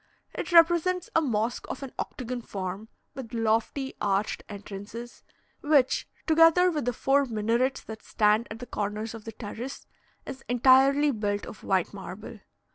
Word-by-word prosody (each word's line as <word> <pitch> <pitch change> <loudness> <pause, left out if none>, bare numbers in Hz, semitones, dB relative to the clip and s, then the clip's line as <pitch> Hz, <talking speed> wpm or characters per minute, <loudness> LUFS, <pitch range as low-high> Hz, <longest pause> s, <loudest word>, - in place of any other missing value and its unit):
It - - -5
represents 345 +1 +4
a 325 - +5
mosque 235 -4 -1
of - - -5
an 270 - -7
octagon 250 0 -4
form, 195 0 -6 0.2
with 245 -2 -8
lofty 230 +4 0
arched 200 +1 0
entrances, 205 +4 -8 0.4
which, 290 -4 +2 0.2
together 330 +3 +5
with 300 -6 -2
the 245 - +1
four 275 +3 +2
minarets 235 +3 0
that 220 -1 -9
stand 215 +2 +2
at 220 - -7
the 245 - -8
corners 210 0 -4
of 225 -2 -10
the 225 - -6
terrace, 230 +5 -7 0.4
is 265 - -8
entirely 270 +4 +5
built 205 -3 -2
of - - -11
white - - 0
marble. - - -9
240 Hz, 150 wpm, -27 LUFS, 215-275 Hz, 0.4 s, a